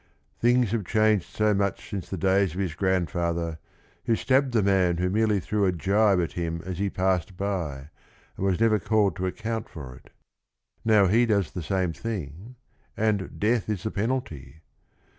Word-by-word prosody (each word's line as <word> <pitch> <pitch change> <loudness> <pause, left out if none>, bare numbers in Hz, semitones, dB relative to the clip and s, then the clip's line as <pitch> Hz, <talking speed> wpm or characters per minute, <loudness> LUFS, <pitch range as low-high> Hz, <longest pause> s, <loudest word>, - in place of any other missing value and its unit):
Things 120 -2 +3
have 115 -2 0
changed 110 -1 +2
so 105 0 +1
much 100 0 -1
since 95 -4 -5
the 95 - -4
days 95 -1 +2
of - - -4
his 95 -5 -1
grandfather, 85 -2 -1 0.5
who 115 - +2
stabbed 130 +3 +2
the 115 -4 +2
man 95 -3 +2
who 90 +1 0
merely 105 0 +2
threw 100 +2 0
a - - +3
gibe 100 +3 +2
at 85 - -1
him 85 -1 -3
as 95 -1 -5
he 100 0 0
passed 95 -1 -1
by, 80 -8 -3 0.4
and - - -5
was 95 -1 +1
never 110 -2 +3
called 105 +1 +1
to 95 0 -1
account 110 +3 -4
for 65 -5 -9
it. - - -18 0.7
Now 110 -3 +5
he 115 +6 +3
does 100 -6 +1
the 90 - -5
same 90 +1 -1
thing 100 - -6 0.4
and 105 -3 -1
"death 110 0 +1
is 105 -4 -2
the 110 - -2
penalty." 85 - -4
95 Hz, 180 wpm, -26 LUFS, 85-110 Hz, 0.7 s, Now